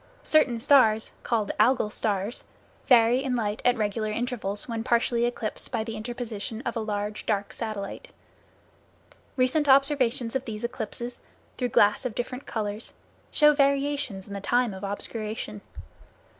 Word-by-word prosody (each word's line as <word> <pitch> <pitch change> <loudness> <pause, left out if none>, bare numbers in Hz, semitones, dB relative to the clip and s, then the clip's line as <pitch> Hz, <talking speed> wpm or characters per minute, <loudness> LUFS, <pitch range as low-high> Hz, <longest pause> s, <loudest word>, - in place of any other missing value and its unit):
Certain 270 -7 +3
stars, 225 -4 +4
called 220 -4 0
Algol 220 -1 +3
stars, 210 +1 -2 0.4
vary 245 +1 +5
in 260 -2 -1
light 215 -3 -2
at 245 0 +3
regular 215 0 -1
intervals 215 -3 -1
when 230 -2 -3
partially 235 0 +2
eclipsed 230 -3 -5
by 230 -3 -1
the 225 0 -6
interposition 225 -1 -5
of - - -3
a - - -1
large 210 -1 -3
dark 205 -2 -1
satellite. 215 - -5 1.3
Recent 270 +3 +2
observations 265 -3 +3
of 265 0 -1
these 220 -2 -6
eclipses, 235 0 -4 0.3
through 250 -1 -1
glass 210 0 +4
of 250 -4 -3
different 250 +2 -5
colors, 210 0 -4 0.4
show 300 -1 +5
variations 280 -7 0
in 200 - -8
the 200 - -5
time 240 +1 +1
of 190 +1 -9
obscuration. 210 +1 -2
230 Hz, 145 wpm, -26 LUFS, 210-250 Hz, 1.3 s, vary